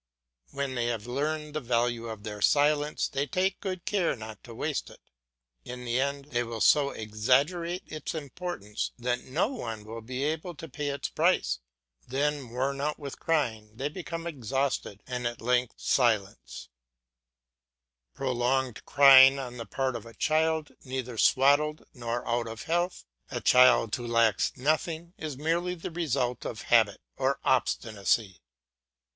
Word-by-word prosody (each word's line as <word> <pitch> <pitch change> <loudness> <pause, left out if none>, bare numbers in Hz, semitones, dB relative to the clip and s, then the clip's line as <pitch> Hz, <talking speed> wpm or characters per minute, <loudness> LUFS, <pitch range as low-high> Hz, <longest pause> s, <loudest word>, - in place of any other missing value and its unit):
When 140 - -3
they 120 -2 -1
have 115 -2 -2
learned 150 +4 -2
the 155 - -2
value 120 -1 0
of 110 -2 -7
their 105 -1 -6
silence 150 +3 +3
they 140 +1 -2
take 190 +2 0
good 185 -3 -4
care 195 -5 +1
not 110 -2 -9
to 115 -2 -10
waste 150 +4 -2
it. - - -15 0.6
In 125 0 -7
the 120 +1 0
end 140 +1 -3
they 120 - +1
will 115 -1 -4
so 140 +4 +5
exaggerate 140 - 0
its 155 +1 -6
importance 145 - -4
that 125 0 -2
no 160 - 0
one 115 - -5
will 115 +1 -7
be 125 +4 -4
able 160 +3 -2
to 165 - -8
pay 150 -2 -4
its 140 0 -2
price; - - +1 0.5
then 140 0 -1
worn 135 +3 -2
out 150 +1 -1
with 140 -2 -8
crying 110 -9 -1
they 135 +5 -2
become 165 0 -6
exhausted, 135 - -2
and 125 -1 -2
are 120 - -2
at - - -21
length 125 +1 +1
silent. 100 - 0 1.5
Prolonged 130 -1 0
crying 135 -1 +8
on 125 -2 -6
the 115 - -7
part 130 -2 -1
of 115 -1 -6
a 115 - -13
child 160 0 +1
neither 130 -2 -4
swaddled 145 +3 +3
nor 120 -1 -4
out 120 0 0
of 115 0 -7
health, 175 +2 -1 0.2
a - - -3
child 125 -4 +5
who 120 -1 -6
lacks 115 -3 +3
nothing, 160 +5 -1
is 150 -4 -5
merely 170 +4 0
the 170 - -6
result 135 -8 -1
of 110 - -5
habit 110 -4 +4 0.2
or 135 +1 +1
obstinacy. 110 -5 0
130 Hz, 155 wpm, -28 LUFS, 120-150 Hz, 1.5 s, crying